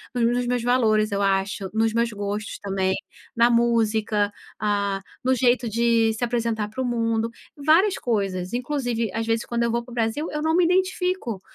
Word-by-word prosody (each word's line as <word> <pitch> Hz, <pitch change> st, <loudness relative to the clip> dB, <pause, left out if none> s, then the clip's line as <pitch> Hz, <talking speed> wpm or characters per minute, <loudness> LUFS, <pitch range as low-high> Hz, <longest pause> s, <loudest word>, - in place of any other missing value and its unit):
nos 235 Hz, -, +2 dB
nos 245 Hz, -, -1 dB
meus 245 Hz, -1 st, 0 dB
valores, 220 Hz, -3 st, +2 dB
eu 200 Hz, 0 st, 0 dB
acho, 195 Hz, 0 st, 0 dB
nos 225 Hz, 0 st, +1 dB
meus 235 Hz, 0 st, +1 dB
gostos 205 Hz, 0 st, -4 dB
também, 190 Hz, -1 st, -1 dB, 0.4 s
na 235 Hz, +1 st, +5 dB
música, 220 Hz, -3 st, +2 dB, 0.3 s
ah, 200 Hz, -2 st, 0 dB, 0.2 s
no 260 Hz, +1 st, +3 dB
jeito 245 Hz, -1 st, +2 dB
de 230 Hz, 0 st, +2 dB
se 225 Hz, +2 st, -4 dB
apresentar 230 Hz, -3 st, -1 dB
para 240 Hz, +5 st, -5 dB
o -, -, -1 dB
mundo, 230 Hz, -1 st, 0 dB, 0.3 s
várias 310 Hz, +5 st, +5 dB
coisas. 195 Hz, -4 st, -2 dB
Inclusive, 245 Hz, -4 st, -1 dB
às 225 Hz, 0 st, -2 dB
vezes, 225 Hz, 0 st, 0 dB
quando 235 Hz, 0 st, -1 dB
eu 235 Hz, -, +1 dB
vou 235 Hz, +1 st, -1 dB
pro 240 Hz, 0 st, -12 dB
Brasil, 235 Hz, +7 st, -1 dB
eu 300 Hz, -, -3 dB
não 320 Hz, +1 st, +1 dB
me 360 Hz, -, +4 dB
identifico 360 Hz, -, 0 dB
230 Hz, 180 wpm, -24 LUFS, 210-245 Hz, 0.4 s, na